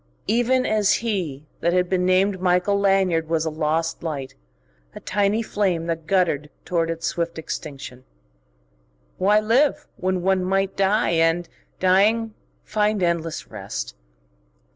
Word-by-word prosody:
Even 245 +4 +2
as 210 -2 +3
he 165 -10 -2
that 170 - +1
had 180 0 +2
been 180 0 +1
named 185 +1 +2
Michael 180 +2 +2
Lanyard 190 -5 +2
was 165 -1 +1
a 160 - -1
lost 160 +1 -1
light, 145 -5 -4 0.6
a - - -7
tiny 205 +3 0
flame 190 -6 -1
that 165 -1 -4
guttered 165 -6 +1 0.2
toward 165 -2 0
its 165 0 -4
swift 170 -1 -2
extinction.... 135 -5 -7 1.2
Why 205 +3 +4
live, 270 +7 +2
when 185 -1 -1
one 190 0 +2
might 195 +1 0
die 195 +2 +2
and, 165 +1 +2 0.3
dying, 210 +4 +3 0.3
find 210 -2 0
endless 165 -2 -2
rest? 95 - -5
180 Hz, 135 wpm, -23 LUFS, 165-200 Hz, 1.2 s, Why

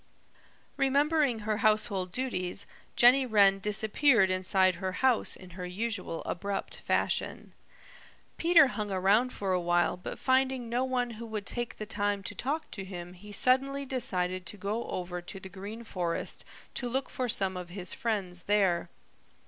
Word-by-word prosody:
Remembering 280 -2 +2
her 215 -1 0
household 210 -4 +2
duties, 195 -5 -3 0.3
Jenny 250 +3 +6
Wren 200 -5 +4
disappeared 210 +1 +3
inside 185 0 +3
her 190 -1 -2
house 255 +4 +2
in 185 -1 -13
her 180 +1 -6
usual 195 -3 -3
abrupt 200 +3 -3
fashion. - - -1 0.8
Peter 335 -2 +6
hung 210 -4 -3
around 200 +6 +3
for 195 -5 -2
a 180 - +2
while 175 -1 +2
but 180 - -7
finding 260 -1 +1
no 245 +2 +1
one 250 -2 -1
who 230 +1 -8
would 215 -2 -4
take 240 +2 -3
the 215 - -5
time 205 -1 -1
to 205 - -5
talk 280 - -3
to 195 - -5
him 180 -2 -8
he 205 +3 -12
suddenly 270 +6 +2
decided 185 -8 -2
to 210 - -4
go 205 +4 -3
over 180 -1 -4
to 195 +3 -8
the 190 - -9
Green 205 +4 -8
Forest 175 -6 -3 0.3
to 245 - -3
look 265 +2 -1
for 255 -1 -3
some 195 -3 +1
of 180 -1 -6
his 180 0 -4
friends 195 -8 -3
there. 190 -5 +2
205 Hz, 160 wpm, -30 LUFS, 185-245 Hz, 0.8 s, Jenny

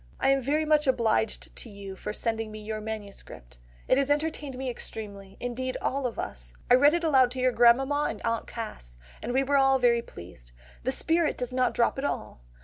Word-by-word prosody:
"I - - +2
am 275 0 +3
very 295 +5 +1
much 305 -1 +3
obliged 225 -3 0
to 235 - -4
you 200 -2 -8
for 210 - -5
sending 225 0 -2
me 215 - -8
your 215 0 -5
MS. 215 -2 -6 0.6
It 260 - +4
has 280 0 0
entertained 295 -2 -1
me 265 0 -4
extremely; 200 -5 -7
indeed 255 +1 -3
all 270 -1 -1
of 235 - -7
us. - - -6 0.2
I - - +9
read 285 +5 +6
it 345 - -1
aloud 265 -6 +5
to 260 - -5
your 255 0 +3
grandmamma 265 +5 +4
and 215 - -5
aunt 230 0 -1
Cass, 60 - -8 0.2
and 235 - -3
we 265 +2 +2
were 280 +1 +2
all 270 -1 +5
very 240 -2 +3
pleased. 60 - -13 0.3
The - - +2
spirit 325 -1 +1
does 250 0 -4
not 255 -1 +1
drop 235 +3 +2
at - - -4
all. 105 - -3
245 Hz, 210 wpm, -27 LUFS, 215-270 Hz, 0.6 s, I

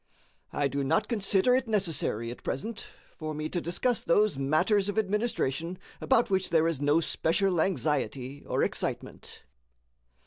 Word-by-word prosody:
I 145 - 0
do 140 0 -2
not 135 - +1
consider 210 +1 +2
it 260 -1 0
necessary, 165 - -1
at 120 - -10
present, 220 - -4 0.3
for 155 -1 -5
me 155 +1 -3
to 175 - -2
discuss 220 +9 0
those 205 +1 +3
matters 175 +9 +2
of 205 - -4
administration 190 - -1 0.2
about 240 -5 +2
which 190 -1 +1
there 165 -1 +3
is 160 -5 -2
no 145 +3 +3
special 175 +2 +1
anxiety, 145 -6 -1
or - - +1
excitement. - - -4
170 Hz, 145 wpm, -28 LUFS, 145-205 Hz, 0.3 s, those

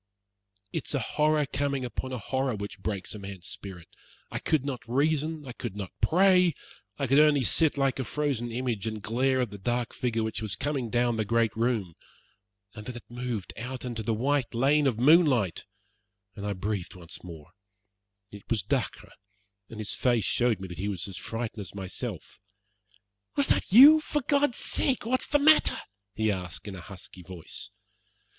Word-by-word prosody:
It - - -3
is - - +2
a - - +1
horror 150 0 +1
coming 140 0 -2
upon 130 +1 -5
a 130 - -3
horror 130 +2 -1
which 100 0 -7
breaks 100 -1 -3
a 105 - -7
man's 95 -3 -8
spirit. 95 -4 -7 0.4
I - - -3
could 150 -4 0
not 135 -4 -3
reason, 150 +4 0
I - - -5
could 120 -4 -6
not 100 -3 -6
pray; 180 -2 +4 0.4
I 140 - -1
could 135 +3 +4
only 150 -3 +5
sit 155 +5 +2
like 135 -1 +1
a - - 0
frozen 130 -2 -2
image, 115 -3 -2
and 110 -2 -5
glare 130 +3 +1
at 120 -5 -2
the 100 - -9
dark 120 +4 -2
figure 115 -3 -1
which 110 0 -3
was 110 -3 -2
coming 140 -5 -2
down 120 0 +1
the 110 - +1
great 115 0 +1
room. 110 -6 0 0.8
And 105 -1 -9
then 125 - -5
it 120 - -8
moved 120 -5 -4
out 125 +2 -6
into 120 -2 -4
the 110 +1 -1
white 130 +1 0
lane 140 +4 +3
of 120 -5 0
moonlight, 130 - +4 0.7
and 100 -1 -5
I 100 - -1
breathed 100 -1 -4
once 85 -2 -10
more. 80 -3 -11 0.8
It 100 -1 -13
was 110 -5 +1
Dacre, 130 +2 -3 0.6
and 110 - -9
his 105 - -2
face 120 -4 +1
showed 120 -5 +1
that 90 -1 -9
he 100 - -2
was 100 -3 -3
as 95 -3 -7
frightened 115 -1 -5
as 95 -1 -9
myself. 95 -2 -6 1.0
"Was 280 - +6
that - - +1
you? 285 +9 +10
For 295 -2 -2
God's 285 -3 +2
sake 260 -5 +1
what's 255 +3 +2
the 290 - +3
matter?" 310 +2 +6 0.4
he 110 -1 +1
asked 90 -1 -6
in 100 - -6
a 90 - -8
husky 95 0 -11
voice. 85 -2 -8
120 Hz, 185 wpm, -28 LUFS, 105-140 Hz, 1.0 s, you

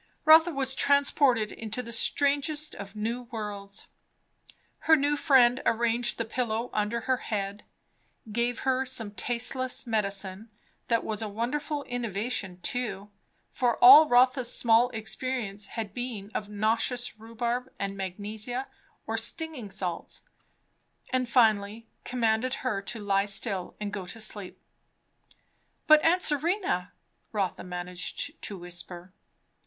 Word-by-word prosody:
Rotha 320 +2 +8
was 265 -3 0
transported 280 -6 +3
into 225 +3 -5
the 235 - -8
strangest 290 +5 +1
of 200 +1 -8
new 235 +3 -3
worlds. 205 -3 -6 0.9
Her 320 - +5
new 290 0 +1
friend 260 -4 +4
arranged 235 +1 +1
the 230 - -1
pillow 230 0 -2
under 215 +3 -1
her 260 -1 +1
head, 200 -3 -4 0.7
gave 240 +2 -1
her 265 0 +1
some 245 -5 -4
tasteless 245 +4 -1
medicine; 200 -2 -3 0.4
that 230 -1 +1
was 215 0 -3
a 220 - -3
wonderful 285 +7 -3
innovation 225 -6 -3
too, 215 -4 -3 0.4
for 245 -3 +1
all 285 +5 +9
Rotha's 250 0 +4
small 235 +1 +4
experience 220 -3 -3
had 215 -3 -4
been 225 -4 -5
of 205 - -4
nauseous 225 +3 -1
rhubarb 235 +3 -3
and 195 0 -3
magnesia 210 +7 -4 0.4
or - - -2
stinging 320 -10 -2
salts; 180 -3 -4 0.9
and 255 -2 0
finally 220 -2 +2 0.2
commanded 245 +1 0
her 210 -6 0
to 225 +3 -6
lie 200 -1 +1
still 200 -2 -1
and 210 -1 -4
go 190 -3 -5
to 225 - -8
sleep. 210 -3 -5 1.3
"But 310 -1 +7
aunt 360 +3 +3
Serena 300 - 0 0.2
?" - - -45
Rotha 200 -4 -2
managed 180 0 -5
to 200 - -5
whisper. 175 +1 -7
230 Hz, 125 wpm, -28 LUFS, 205-255 Hz, 1.3 s, all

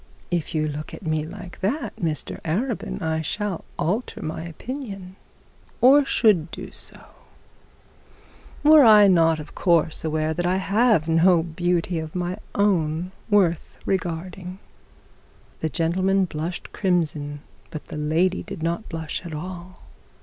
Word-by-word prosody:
'If 170 -2 -2
you 155 0 +1
look 150 +1 -6
at - - -12
me 155 -1 0
like 180 +2 -9
that, 245 +11 -2
Mr 160 -4 -3
Arabin, 210 +8 -2
I 160 0 0
shall 200 +3 -3
alter 200 +11 -1
my 155 +1 -4
opinion 195 - -7 0.6
or 275 +4 +7
should 200 - +3
do - - -8
so, - - -5 1.6
were 305 0 +8
I 210 -3 +8
not 165 -4 +4
of 150 -1 -9
course 170 -3 +2
aware 155 0 0
that 175 +2 -1
I 180 - +2
have 200 -2 +2
no 165 +1 +4
beauty 175 +1 -1
of 160 +1 -7
my 180 +2 -2 0.2
own 180 -4 +1 0.2
worth 185 -6 +2
regarding.' 180 0 -3 1.0
The 160 - -1
gentleman 185 +6 +1
blushed 165 +1 -5
crimson, 150 -6 -1 0.3
but 155 - -8
the - - -6
lady 165 +5 +1
did 160 - -7
not 170 +6 -2
blush 160 0 -4
at 165 -3 -6
all. 180 +3 -8
175 Hz, 135 wpm, -24 LUFS, 160-195 Hz, 1.6 s, were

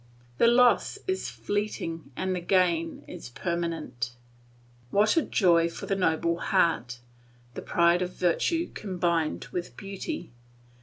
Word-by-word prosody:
The - - +6
loss 245 +1 +4
is 375 0 -2
fleeting, 165 -7 -3
the 185 -1 -1
gain 170 -2 +1
is - - -8
permanent. 165 -6 -3 0.7
What 210 +8 +3
a 330 - +4
joy 170 - +3
for - - -7
a - - +1
noble 170 -2 +1
heart 120 -10 +1 0.6
the - - -6
pride 170 +1 +3
of 180 0 -3
virtue 330 - +1
combined 175 -5 -1
with 175 -1 -5
beauty. 195 - -6
175 Hz, 120 wpm, -27 LUFS, 165-200 Hz, 0.7 s, The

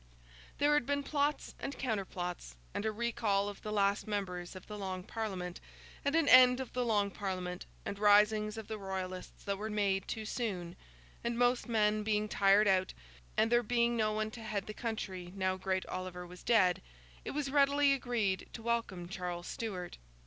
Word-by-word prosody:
There 290 +1 +4
had 295 -5 +2
been 285 0 0
plots 290 0 0
and 280 - -5
counterplots, 180 - -3 0.2
and 215 - -1
a - - +1
recall 215 -3 0
of 205 -1 -7
the 215 - -5
last 200 0 +1
members 185 -4 -3
of 185 - -9
the 210 - -7
Long 190 -2 -4
Parliament, 185 -5 -4 0.4
and 280 +2 +1
an 325 -3 +3
end 255 -1 +8
of 265 - -5
the 250 - 0
Long 205 -4 +2
Parliament, 185 -3 -4 0.2
and 200 - -4
risings 210 +1 +4
of 220 - -6
the 220 -1 -5
Royalists 190 -1 -5
that 200 -1 -2
were 215 +1 -3
made 200 -2 0
too 220 -1 -4
soon; 190 -7 -3 0.5
and 235 0 -1
most 245 0 +2
men 215 -1 +2
being 210 0 0
tired 200 +1 +4
out, 190 -1 +2 0.4
and 225 +1 +3
there 240 0 +5
being 235 +1 +2
no 215 -2 +2
one 215 0 -1
to 230 - -9
head 210 -3 -3
the 215 - -6
country 190 -6 -4
now 185 -1 0
great 185 0 -1
Oliver 185 -1 -5
was 180 +1 -12
dead, 190 -7 +3 0.4
it - - -5
was 280 -2 -2
readily 280 0 +4
agreed 235 -8 -1
to 225 - -8
welcome 230 -7 -1
Charles 180 -2 -4
Stuart. 185 - -5
210 Hz, 185 wpm, -33 LUFS, 190-235 Hz, 0.5 s, end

